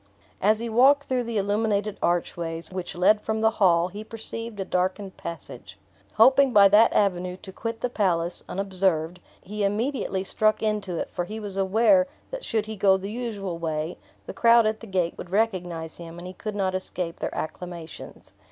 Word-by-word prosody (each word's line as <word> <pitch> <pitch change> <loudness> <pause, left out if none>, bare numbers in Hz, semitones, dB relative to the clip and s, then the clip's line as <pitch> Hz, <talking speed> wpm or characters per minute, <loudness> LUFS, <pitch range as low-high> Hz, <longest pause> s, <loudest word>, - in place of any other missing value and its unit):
As 215 +3 +4
he 235 +2 -4
walked 265 +5 +5
through 255 -3 -1
the 230 -1 -3
illuminated 205 0 0
archways, 170 -1 -2
which 185 -2 -5
led 210 +4 +4
from 220 +1 -2
the 220 0 +4
hall, 175 -2 +4
he 205 +3 -7
perceived 225 0 -7
a 195 - -2
darkened 185 +2 -2
passage. 170 0 -9 0.4
Hoping 265 +4 +6
by 200 -3 +7
that 210 +3 +6
avenue 180 -3 0
to 190 - -8
quit 230 +3 -5
the - - +1
palace, 175 -6 0
unobserved, 180 -3 -1 0.2
he 210 +2 -4
immediately 205 -1 -1
struck 215 +3 +1
into 210 -5 -1
it; - - -4
for 175 - -3
he 215 +4 -6
was 205 -3 -5
aware, 230 +9 +4 0.2
that - - -5
should 220 -2 -1
he 220 0 -6
go 195 -1 +4
the 195 +2 -6
usual 205 -7 -4
way, 160 0 -3 0.3
the - - -7
crowd 235 -1 +5
at 215 0 0
the 225 - -11
gate 180 -3 0
would 175 - -7
recognize 180 -6 -1
him, 170 0 -9
and 175 - -8
he 185 - -7
could 215 +2 -6
not 190 -2 0
escape 180 -2 -4
their - - -4
acclamations. 170 -1 -7
200 Hz, 185 wpm, -25 LUFS, 180-220 Hz, 0.4 s, by